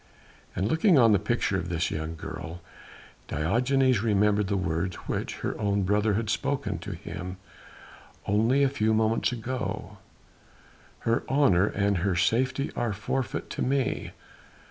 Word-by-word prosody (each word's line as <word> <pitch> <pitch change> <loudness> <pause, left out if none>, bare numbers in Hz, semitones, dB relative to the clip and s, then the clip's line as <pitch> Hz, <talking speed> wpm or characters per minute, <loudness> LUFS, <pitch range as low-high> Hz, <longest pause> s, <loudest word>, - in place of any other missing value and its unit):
And 95 - 0
looking 160 - +4
on 115 -4 +6
the 100 - +4
picture - - 0
of 85 - -4
this 85 0 -1
young 80 +1 -4
girl, 80 +2 -7 0.7
Diogenes 125 - +2
remembered 105 -2 +2
the 100 0 0
words 85 0 -1
which - - -3
her - - -1
own 100 -1 +1
brother 105 +2 +2
had 115 +1 -1
spoken 140 +6 -1
to - - -6
him 90 +1 -7 0.9
only 115 +7 +3
a - - +5
few 110 -5 +1
moments 110 +2 +2
ago; 110 -4 -4 1.0
"her 115 +1 +1
honour 130 -10 +4
and 100 -1 +1
her 95 +1 0
safety 130 +10 +1
are 120 -3 -1
forfeit 110 +3 -3
to - - -4
me. 135 -1 0
105 Hz, 145 wpm, -27 LUFS, 95-125 Hz, 1.0 s, on